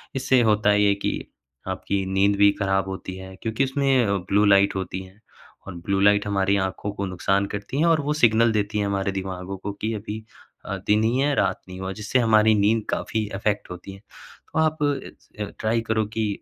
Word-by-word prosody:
इससे 130 -1 +3
होता 105 0 +3
है 105 0 +4
ये 100 -1 +4
कि 100 - -2 0.6
आपकी 100 -1 -2
नींद 95 +2 +2
भी 100 0 +6
ख़राब 95 -1 +1
होती 95 -1 -6
है 95 0 -10
क्योंकि 115 +4 0
उसमें 135 -2 +2
अ, 100 - +1
ब्लू 100 +3 +1
लाइट 100 -1 +4
होती 95 0 -4
है 95 +2 -17 0.5
और 95 - -7
ब्लू 100 -1 +1
लाइट 105 +1 +4
हमारी 100 0 +1
आँखों 100 +2 -5
को 100 -1 -3
नुकसान 95 +2 0
करती 105 +7 -4
है 170 - +4
और 160 -2 +3
वो 145 +1 -1
सिग्नल 115 0 +5
देती 105 0 -1
है 105 - 0
हमारे 100 0 -1
दिमागों 95 0 -5
को 100 +2 -5
कि 110 +1 -1
अभी 110 +1 -6 0.4
अ, 100 - -3
दिन 105 +1 +3
ही 115 +3 +1
है 145 +1 +2
रात - - 0
नहीं 90 0 -8
हुआ 95 0 -3
जिससे 110 +5 +1
हमारी 110 -2 +4
नींद 110 +2 +2
काफ़ी 110 -1 -2
अफेक्ट 105 0 -1
होती 90 +2 -8
है। 95 - -12 0.5
तो - - 0
आप 155 0 +2
इस 145 -2 -3
अ, - - -1 0.2
ट्राई 115 +1 +1
करो 110 -1 +1
कि 110 -1 +1
105 Hz, 210 wpm, -24 LUFS, 95-110 Hz, 0.6 s, भी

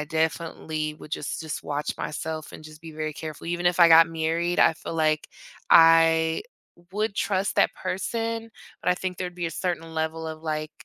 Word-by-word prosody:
I - - -2
definitely 160 -1 -2
would 155 - -13
just 150 -2 -4
just 160 -2 -5
watch 145 0 -3
myself 155 +1 -5
and - - -10
just 155 0 -12
be 165 -1 -9
very 155 0 -4
careful. 155 +1 -8
Even 175 +1 -1
if 175 0 +2
I 170 - +9
got 165 0 +8
married, 165 +2 0
I - - +5
feel 160 - -7
like 155 -1 +1 0.4
I 165 0 +6 0.5
would 210 +1 -1
trust 195 +1 0
that - - +3
person, 225 +3 -3 0.3
but - - -1
I - - +3
think 180 0 -5
there'd 180 -1 -4
be 175 -1 -3
a - - -4
certain 165 -1 -3
level 160 0 -2
of 155 0 -8
like 155 -1 -3
160 Hz, 195 wpm, -25 LUFS, 155-175 Hz, 0.5 s, I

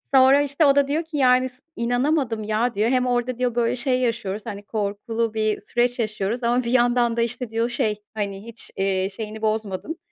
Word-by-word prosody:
Sonra, 265 +2 +7
işte, 290 +2 +2
o 275 - +5
da 280 -1 +4
diyor 310 +4 0
ki, 320 -2 -6
"Yani 255 -1 +4
s 255 +2 -13
inanamadım 245 -1 0
ya," 220 +3 0
diyor. 215 +3 +2
"Hem 255 -1 +2
orada," 245 0 0
diyor, 250 -2 -1
"böyle, 235 0 +1
şey 255 0 +1
yaşıyoruz, 220 -4 -2
hani, 205 0 -6
korkulu 215 +2 -2
bir 215 -1 0
süreç 240 +3 0
yaşıyoruz 215 +2 -2
ama 245 +2 +2
bir 235 - -2
yandan 240 -1 +3
da," - - +2
işte, 240 0 -2
diyor, 230 +1 0
"şey, 220 -3 0 0.2
hani, 200 -2 -4
hiç, 230 -1 -9
eee, 190 0 0
şeyini 220 -1 -6
bozmadın, 215 - -2
235 Hz, 200 wpm, -23 LUFS, 215-255 Hz, 0.2 s, Sonra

